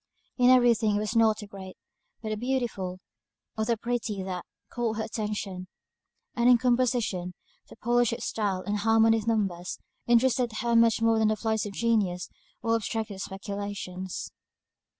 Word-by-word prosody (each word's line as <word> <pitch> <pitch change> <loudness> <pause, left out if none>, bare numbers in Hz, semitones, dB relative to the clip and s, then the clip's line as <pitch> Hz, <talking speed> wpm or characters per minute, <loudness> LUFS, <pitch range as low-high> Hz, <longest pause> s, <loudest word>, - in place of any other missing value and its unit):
In 250 0 +6
every 245 -2 +6
thing 215 -2 0
it - - +1
was 215 +2 -3
not 220 -2 +4
the 210 - -7
great, 190 -2 -10 0.5
but 220 - -3
the 215 - -1
beautiful, 225 -6 -2 0.6
or 220 - -1
the 230 0 +1
pretty, 230 -4 -2
that 185 -2 -5 0.3
caught 230 -2 -1
her 220 - -1
attention. 210 -4 -4 0.7
And 240 0 +3
in 245 - +7
composition, 240 -7 0 0.3
the - - -12
polish 240 0 +2
of 230 - -4
style, 195 -4 -1
and 205 +2 -1
harmony 225 +1 +4
of 215 - -8
numbers, 195 -6 -1 0.3
interested 240 0 +3
her 235 0 +1
much 230 -1 +4
more 225 -1 +4
than 220 - +3
the 215 - +2
flights 220 -1 -1
of 200 - -8
genius, 200 -6 0 0.3
or 230 - +1
abstracted 220 -3 -3
speculations. 195 -2 -5
220 Hz, 165 wpm, -27 LUFS, 200-235 Hz, 0.7 s, in